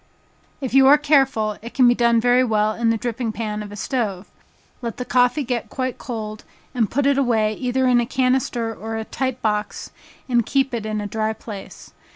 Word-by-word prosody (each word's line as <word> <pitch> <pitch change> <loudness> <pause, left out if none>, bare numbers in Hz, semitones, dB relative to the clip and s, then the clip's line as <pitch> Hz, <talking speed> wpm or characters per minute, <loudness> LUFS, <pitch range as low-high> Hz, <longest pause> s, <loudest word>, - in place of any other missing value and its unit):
If 260 -3 -4
you 270 0 +6
are 290 +2 +8
careful, 270 -8 +2
it 235 +2 -10
can 255 -3 +5
be 240 - +6
done 235 -1 +3
very 245 +2 +4
well 215 -2 +1
in 230 +1 0
the 225 - +2
dripping 235 0 -3
pan 215 -1 -4
of 205 -1 -8
a - - -8
stove. 205 -4 -2 0.6
Let 235 -2 -5
the 250 - -4
coffee 250 +4 +2
get 245 -3 -3
quite 255 -1 -3
cold, 215 -3 -6 0.3
and 230 -6 +1
put 280 +2 0
it 280 0 +3
away 220 -5 +2
either 255 +3 -1
in 250 -1 +4
a 235 - -3
canister 255 -3 0
or 225 +1 -5
tight 260 +2 -3
box, 210 -1 -2 0.4
and 240 -2 +2
keep 270 +2 0
it 225 -2 -3
in 215 -1 -2
a - - -4
dry 220 +1 -1
place. 210 -2 -10
235 Hz, 200 wpm, -21 LUFS, 215-255 Hz, 0.6 s, are